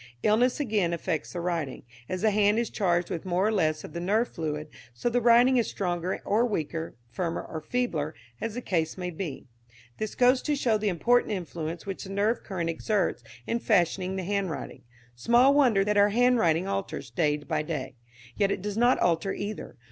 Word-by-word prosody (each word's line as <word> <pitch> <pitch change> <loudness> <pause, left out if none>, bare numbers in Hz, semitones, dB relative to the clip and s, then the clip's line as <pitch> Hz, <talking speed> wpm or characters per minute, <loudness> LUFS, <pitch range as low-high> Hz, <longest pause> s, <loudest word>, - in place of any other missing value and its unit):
"Illness, 240 +6 +3
again, 210 -10 +1
affects 160 -2 -3
the 175 - -3
writing. 170 -6 -3 0.3
As 185 +1 -3
the 220 - +4
hand 205 +1 +3
is 235 -1 -1
charged 175 -4 0
with 165 - -3
more 185 +1 +1
or 215 - +2
less 155 -7 +1
of - - -9
the 170 - -4
nerve 210 +7 +1
fluid, 155 -1 -4 0.3
so 180 - -1
the 245 +1 +1
writing 240 +2 +6
is 235 - +1
stronger 180 -1 -2
or 215 +4 +2
weaker, 165 -7 -2 0.2
firmer 165 +7 -2
or 160 - -6
feebler, 165 -12 -2 0.3
as 225 -1 -3
the 245 - -4
case 165 -2 -1
may 180 -1 -3
be. 160 -4 -6 0.5
"This 215 -1 -3
goes 250 +1 +4
to 300 - 0
show 230 -6 +1
the 210 0 0
important 230 +6 +2
influence 170 -3 -5
which 195 -2 -5
the - - -9
nerve 205 +4 0
current 180 -5 -3
exerts 195 - -1 0.2
in 235 - -1
fashioning 185 -3 +1
the 190 - -3
handwriting. 195 -3 -3 0.3
Small 240 - +4
wonder 250 -9 +4
that 210 0 +1
our 205 0 +6
handwriting 210 -7 +3
alters 195 -10 -4
day 150 +3 +1
by 150 +1 -2
day. 150 -5 -4 0.4
Yet 200 - +2
it 195 - -2
does 210 0 -3
not 240 +2 +4
alter 175 +3 +1
either. 205 +1 -6
195 Hz, 195 wpm, -27 LUFS, 170-220 Hz, 0.5 s, writing